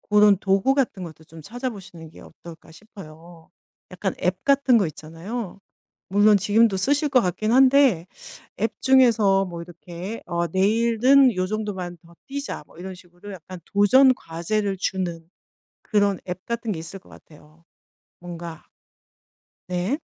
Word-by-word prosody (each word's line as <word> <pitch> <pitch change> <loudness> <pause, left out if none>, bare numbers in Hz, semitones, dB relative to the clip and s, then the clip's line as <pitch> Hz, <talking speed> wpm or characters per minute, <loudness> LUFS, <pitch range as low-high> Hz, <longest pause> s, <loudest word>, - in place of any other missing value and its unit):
고런 210 -2 +4
도구 195 +6 +2
같은 265 -8 -1
것도 160 -2 -10
좀 160 0 -14
찾아보시는 200 - -7
게 155 - -16
어떨까 165 0 -14
싶어요. 170 -4 -14 0.4
약간 - - -3
앱 - - -1
같은 275 -4 +3
거 195 - +1
있잖아요. 175 +7 -7 0.5
물론 205 +2 +4
지금도 205 0 +2
쓰실 290 +7 +1
것 255 - +4
같긴 215 +3 -1
한데 260 -8 +4 0.5
앱 225 +3 -1
중에서 230 -7 +4
뭐 175 -2 -7
이렇게 175 +4 -8
"어 170 0 -1
내일은 230 - +3
요 185 0 -1
정도만 190 -4 -5
더 170 - -18
뛰자." 280 - -6
뭐 - - -20
이런 190 +1 -7
식으로 175 +2 -13
약간 180 +1 -11
도전 255 +7 +5
과제를 195 +3 -3
주는 175 -4 -3 0.5
그런 205 -3 +1
앱 180 +1 -6
같은 235 -2 -3
게 165 - -5
있을 165 +4 -8
것 185 - -23
같아요. 155 +1 -18 0.6
뭔가 170 -2 -9 1.1
네. 185 - -1
195 Hz, 275 characters per minute, -23 LUFS, 170-230 Hz, 1.1 s, 도전